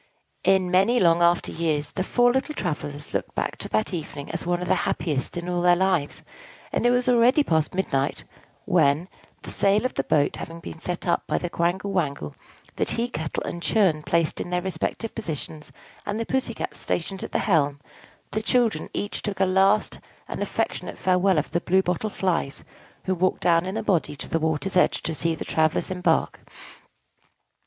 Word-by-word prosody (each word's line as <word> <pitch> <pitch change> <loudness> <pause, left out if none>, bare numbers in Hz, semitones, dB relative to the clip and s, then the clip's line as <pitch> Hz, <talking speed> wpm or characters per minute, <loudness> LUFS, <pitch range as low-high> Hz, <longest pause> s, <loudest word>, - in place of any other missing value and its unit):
In 190 -2 +3
many 195 +7 +4
long 170 -3 +4
after 170 0 +3
years, 155 -3 -1
the 185 - -3
four 245 +4 +3
little 270 +3 -1
travellers 145 - -4
looked - - -3
back - - -2
to - - -7
that 110 +9 0
evening 150 -4 -5
as - - -4
one 175 0 +1
of 180 - -4
the - - +4 0.2
happiest 150 +1 -2
in 175 0 -4
all 175 -1 0
their 175 0 +5
lives; 180 -5 0 0.5
and - - +2
it - - +5
was 245 0 +2
already 250 +4 +5
past 160 - 0
midnight 140 -8 -1 0.4
when 145 +5 +3 0.4
the - - -7
sail 200 +4 +2
of 255 - -1
the - - -1
boat 145 -1 +1
having 165 0 -7
been 165 - -9
set 180 +2 -4
up 175 - +1
by - - +1
the 175 - -3
Quangle 180 +4 0
Wangle, 140 - -1 0.4
the - - +1
tea 235 +1 0
kettle 155 -7 -3
and 175 - -5
churn 180 -7 +2
placed 165 +1 0
in - - -5
their 180 0 -1
respective 190 +5 -3
positions, 155 -6 -6 0.3
and 205 +2 -3
the 230 - -1
Pussy 255 -3 -1
Cat - - -5
stationed 190 +3 -3
at - - -6
the - - +1
helm 145 -7 +2 0.5
the 215 - -1
children 235 0 +1
each 205 - -3
took 205 -3 -4
a 190 - +4
last 195 +3 +3 0.3
and - - -5
affectionate - - -2
farewell 185 0 +2
of 150 - -1
the 170 - 0
Blue 190 +2 +3
Bottle 180 +5 -1
Flies, 175 -8 -1 0.4
who 190 - 0
walked 185 +1 0
down 170 +1 +3
in 190 +3 -3
a 225 - -2
body 175 -7 +1
to - - -8
the 165 - 0
water's 160 +4 -1
edge 180 - +3
to 165 - -2
see 165 +1 0
the - - -6
travellers 155 +3 +1
embark. 180 -3 0
180 Hz, 195 wpm, -25 LUFS, 160-195 Hz, 0.5 s, their